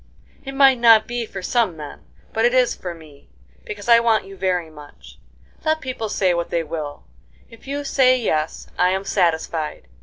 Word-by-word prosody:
"It 270 0 -7
might 270 -2 +5
not 225 -2 +6
be 240 -1 -4
for 195 -3 -8
some 220 -6 0
men, 150 -1 -9 0.3
but 225 - 0
it 240 +2 +3
is 255 -1 +3
for 175 -2 -7
me, 155 -4 -17 0.4
because 205 +1 -8
I 235 -1 +7
want 230 -2 +2
you 195 0 -11
very 180 -3 -1
much. 150 -1 -15 0.4
Let 315 0 +1
people 255 -6 -5
say 190 -3 +1
what 170 0 -2
they 170 - -1
will, 150 - -6 0.5
if 230 +3 -16
you 285 +1 -3
say 255 -2 +3
yes 155 -9 -2
I 180 - +4
am 190 +1 -1
satisfied. 160 - -1
200 Hz, 185 wpm, -21 LUFS, 165-240 Hz, 0.5 s, I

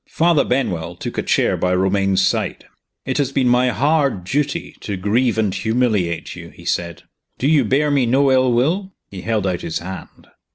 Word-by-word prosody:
Father 165 -2 +3
Benwell 90 -10 -2
took - - -5
a - - +1
chair - - +1
by 90 0 0
Romayne's 95 0 +2
side. - - -2 0.4
"It 130 +2 -1
has 140 -2 0
been 135 -2 +1
my 125 +1 +3
hard 140 - +1
duty 145 - -2
to 100 -2 -5
grieve 110 +5 +1
and 105 -4 +1
humiliate 100 -5 -1
you," - - -10
he - - -16
said. 85 -1 -2 0.3
"Do 135 - 0
you 155 -1 +4
bear 145 +2 +1
me 135 -4 +2
no 135 +3 +3
ill 130 -1 +3
will?" 170 +11 0 0.2
He 95 -2 -7
held 110 -2 -1
out 90 -2 -1
his 80 - -3
hand. 95 +1 -9
120 Hz, 190 wpm, -19 LUFS, 95-140 Hz, 0.4 s, you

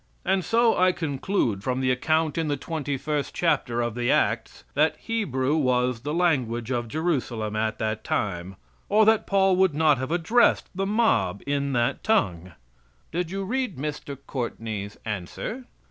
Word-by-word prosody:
And 190 0 +2
so 230 +2 +3
I 185 0 +4
conclude 140 - -1
from 130 +2 -1
the 130 -1 +2
account 155 +4 +1
in 165 -1 -1
the 145 -1 0
twenty 145 -2 -3
first 150 +1 -3
chapter 120 -8 +1
of 120 -1 -1
the 120 +1 -1
Acts - - 0
that - - +2
"Hebrew 150 - -1
was 125 -4 +1
the 145 +3 -3
language 130 -9 0
of 120 -2 -1
Jerusalem 125 -8 -2
at 110 0 -1
that 110 0 -2
time, 95 -1 -2 0.3
or 215 +1 +5
that 220 0 +3
Paul 195 -1 +3
would 190 -5 +3
not 150 -3 +4
have 130 - -3
addressed 175 +9 +2
the 195 +1 -2
mob 200 - +1
in 140 0 -1
that 120 -1 0
tongue." 95 - 0 0.6
"Did 175 0 -2
you 195 +2 -3
read 250 - -2
Mr. 145 0 -5
Courtney's 110 -5 -4
answer?" 110 - -5
145 Hz, 160 wpm, -25 LUFS, 120-180 Hz, 0.6 s, or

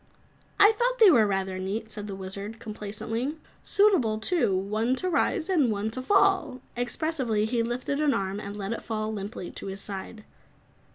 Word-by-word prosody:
"I 410 +2 +8
thought - - 0
they 435 -5 +8
were 225 -8 +5
rather 190 -1 -1
neat," 215 +4 -4
said 210 -1 -6
the 195 - -5
Wizard 200 +3 -6
complacently. 225 +6 -4 0.3
"Suitable 370 - +3
too, 220 - +1
one 215 +6 0
to 370 - -3
rise 355 0 +1
and 320 -10 +3
one 210 +1 -2
to 255 - -4
fall!" 375 -5 +3 0.2
Expressively 245 -3 -1
he 235 +1 0
lifted 250 +5 -2
an 300 -2 +3
arm 195 -1 -2
and 200 0 -7
let 200 +2 -3
it - - -5
fall 220 -1 -3
limply 200 -2 -6
to - - -6
his 195 0 -5
side. 205 +2 -7
225 Hz, 175 wpm, -27 LUFS, 205-290 Hz, 0.3 s, I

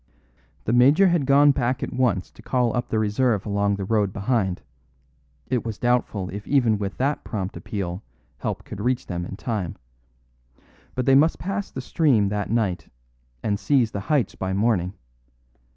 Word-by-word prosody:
The 110 - 0
major 140 +10 +6
had 170 -6 +1
gone 145 +1 +6
back 125 -1 -1
at - - -4
once 115 -8 0
to - - -16
call 125 -2 0
up 120 0 -2
the 110 - 0
reserve 110 0 +1
along 100 -1 +1
the 100 - -4
road 105 -2 +1
behind; 100 - -1 0.8
it 125 -2 -1
was 110 -3 -4
doubtful 120 -6 0
if 100 +3 -7
even 120 -7 +3
with 100 -2 -4
that 140 +3 0
prompt 100 -2 -4
appeal 95 -2 -4 0.4
help - - -3
could 100 - -7
reach 125 +2 0
them 85 -1 -4
in - - -7
time. 105 -9 -3 1.2
But 125 - -1
they 135 - +4
must 150 +5 +5
pass 195 +2 -3
the 130 - -6
stream 130 -8 +2
that 105 0 -2
night, 100 -8 -1 0.5
and 100 -2 0
seize 115 +2 +2
the 100 - -3
heights 145 -6 +2
by 95 0 -3
morning. 100 -3 +1
110 Hz, 170 wpm, -24 LUFS, 100-130 Hz, 1.2 s, major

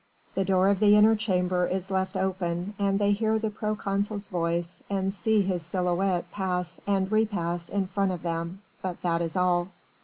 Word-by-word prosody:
The 195 - +1
door 190 0 +3
of 200 -2 +2
the 210 -1 +6
inner 215 +1 +6
chamber 180 -4 +1
is 190 +1 -3
left 190 +1 -1
open 185 0 -1
and 195 -1 +2
they 205 0 +2
hear 220 +2 +2
the 220 -1 -2
proconsul's 205 -1 -2
voice 170 0 -2
and 195 -1 0
see 210 +2 +2
his 185 -2 -1
silhouette 180 +1 0
pass 180 -3 -2
and 195 -1 +1
repass 175 -6 0
in 200 -1 0
front 195 +1 0
of 175 -3 -5
them, 170 +3 -3 0.2
but 185 -2 -4
that 170 -1 +1
is 170 +2 -2
all. 180 -1 +2
190 Hz, 180 wpm, -27 LUFS, 180-200 Hz, 0.2 s, the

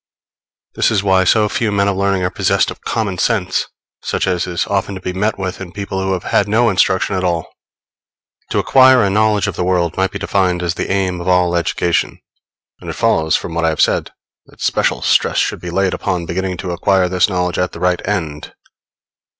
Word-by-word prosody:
This - - +2
is 105 -3 0
why 95 -1 +3
so 105 +3 +3
few 110 +1 -1
men 100 0 +1
of 100 - 0
learning 100 -1 0
are 90 - -1
possessed - - +1
of - - -11
common 100 -5 -2
sense, 95 -6 0 0.3
such - - -1
as 90 -1 -1
is 85 -1 -1
often 100 0 -2
to - - -6
be 90 - -4
met 105 +3 -1
with 95 -1 -5
in 90 -2 -7
people 100 0 -4
who 95 0 -1
have 90 -1 -3
had 100 - +1
no 115 +2 +3
instruction 95 +1 +1
at 95 - -2
all. 85 -3 -1 1.0
To - - -2
acquire 130 -2 +5
a 100 - +1
knowledge 105 0 +2
of 100 -4 -3
the 90 - -2
world 90 -2 0
might 95 0 +1
be - - -6
defined 90 -2 0
as 85 -1 0
the - - -4
aim 95 -2 -1
of 85 - -7
all 90 -1 +2
education; 85 0 0 0.6
and - - -9
it - - -3
follows 80 0 +1
from 85 - -3
what 85 0 -1
I 80 - +3
have 80 - -3
said - - +2 0.4
that - - -21
special - - 0
stress - - +2
should - - 0
be 90 - -6
laid 95 +1 0
upon 90 -3 -2
beginning 90 +2 -3
to 90 - -5
acquire 90 +1 +2
this 90 +2 +2
knowledge 90 -2 -1
at 90 - 0
the - - -8
right 90 0 +1
end. 80 -7 -3
95 Hz, 215 wpm, -17 LUFS, 90-100 Hz, 1.0 s, acquire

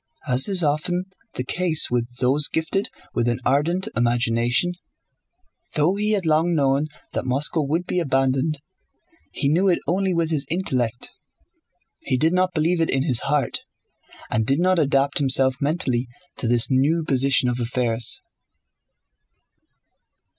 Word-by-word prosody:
As 125 0 +3
is 190 -4 +2
often 155 +5 0 0.3
the 125 - -3
case 165 +1 +1
with 120 -1 0
those 135 +3 +3
gifted 160 +5 -1 0.2
with 120 - 0
an 120 0 0
ardent 165 +8 +1
imagination, 120 +6 +1 1.0
though 155 +5 +2
he 210 +2 0
had 195 -4 0
long 160 +2 +2
known 140 0 +1 0.3
that - - -2
Moscow 140 +5 0
would 160 +5 -1
be 180 - -1
abandoned 135 0 0 0.7
he - - -2
knew 170 +7 +2
it 175 - +3
only 190 +2 0
with 165 -1 0
his 145 -3 -1
intellect, 125 -9 -2 0.9
he 130 - -2
did 160 +6 +2
not 185 0 +1
believe 165 +2 +1
it 165 - +1
in 135 0 +1
his 130 -7 +2
heart 145 -1 -1 0.7
and 110 0 0
did 135 +3 +1
not 185 0 +2
adapt 140 -1 +1
himself 130 -1 +3
mentally 135 -5 0 0.3
to 120 - -3
this 120 0 +4
new 145 +6 +2
position 135 -2 +2
of 125 0 -1
affairs. 120 -1 0
145 Hz, 145 wpm, -22 LUFS, 125-170 Hz, 1.0 s, this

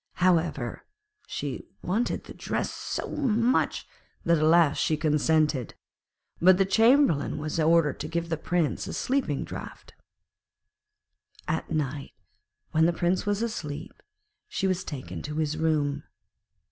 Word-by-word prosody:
However, 165 -8 +1 0.4
she - - -4 0.2
wanted 215 +7 -1
the - - -10
dress - - -2
so - - -4
much 245 -3 +1 0.4
that 170 0 +4
at - - +1
last 160 -2 +4
she 155 - +1
consented; 150 -3 +1 0.7
but 185 +1 +7
the 195 - +3
Chamberlain 225 - +4
was 155 +2 -3
ordered 160 -2 +3
to 150 - -4
give 170 +1 -3
the 160 - +1
Prince 165 0 -1
a - - -5
sleeping 255 - 0
draught. - - -9 1.5
At - - -2
night, 145 -2 -3 0.6
when 160 +1 +4
the 170 - +2
Prince 180 +4 0
was 205 +2 +1
asleep, 155 -9 -5 0.5
she 420 - -2
was 185 -1 0
taken 90 - -6
to 150 - -6
his 155 -1 0
room. 150 -3 0
160 Hz, 135 wpm, -27 LUFS, 150-185 Hz, 1.5 s, but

